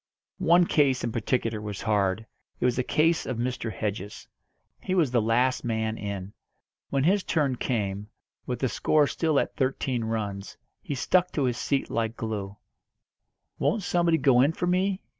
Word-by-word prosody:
One 175 -1 +5
case 140 -6 +2
in 115 - -1
particular 115 -1 -1
was 105 -2 -6
hard. 105 -1 +1 0.3
It - - 0
was 125 -1 +2
the 125 - +1
case 160 +6 +1
of 130 - -3
Mr. 120 -1 -2
Hedges. 100 0 -5 0.5
He 185 - -2
was 160 -8 +2
the 120 -2 +3
last 120 +4 +1
man 110 -2 -1
in; 100 -2 -5 0.6
when 135 -1 +1
his 190 +5 +3
turn 145 -6 +1
came, 105 -5 -2 0.4
with 125 - -2
the 130 - 0
score 150 +4 +2
still 155 0 +1
at - - -2
thirteen 130 -2 -1
runs, 105 -3 -4 0.2
he 145 - -4
stuck 180 +7 +2
to 145 - 0
his 125 -2 0
seat 140 -1 -1
like 115 0 -1
glue. 105 -3 -4 1.0
"Won't 220 -3 +1
somebody 170 -2 +2
go 130 -5 +4
in 145 +5 +3
for 175 - -2
me?" 185 +2 0
125 Hz, 170 wpm, -27 LUFS, 110-155 Hz, 1.0 s, One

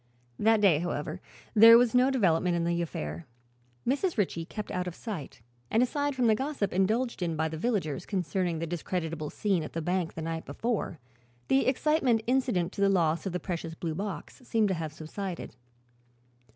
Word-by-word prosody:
That 220 0 +4
day, 180 -7 +5
however, 165 0 -3 0.3
there 230 +1 +10
was 240 -1 +3
no 250 +1 +5
development 180 -8 +2
in 170 - 0
the 170 0 0
affair. 80 - -5 0.6
Mrs. 290 +6 +1
Ritchie 170 -5 0
kept 210 +4 -6
out 180 -2 -2
of 175 - -5
sight 175 - -7 0.3
and 225 - +3
aside 285 +2 -1
from 250 -2 +1
the 220 - +5
gossip 265 -4 -2
indulged 220 +5 +1
in 170 -2 -1
by 160 +1 0
the 160 - -5
villagers 170 - -1
concerning 185 -3 -1
the 165 - -2
discreditable 165 -2 -3
scene 195 -5 0
at 155 - -7
the 165 - -2
bank 180 0 -1
the 160 - -5
night 165 0 -3
before, 210 +2 -2 0.5
the 270 - +3
excitement 260 -4 +2
incident 245 -9 +1
to - - -4
the 200 - +5
loss 170 -2 +1
of - - -2
the 180 - -2
precious 165 -2 -4
blue 165 -1 -3
box 200 - -6
seemed 225 -4 +1
to - - +1
have 160 -3 -4
subsided. 170 +4 -6
185 Hz, 185 wpm, -29 LUFS, 165-225 Hz, 0.6 s, there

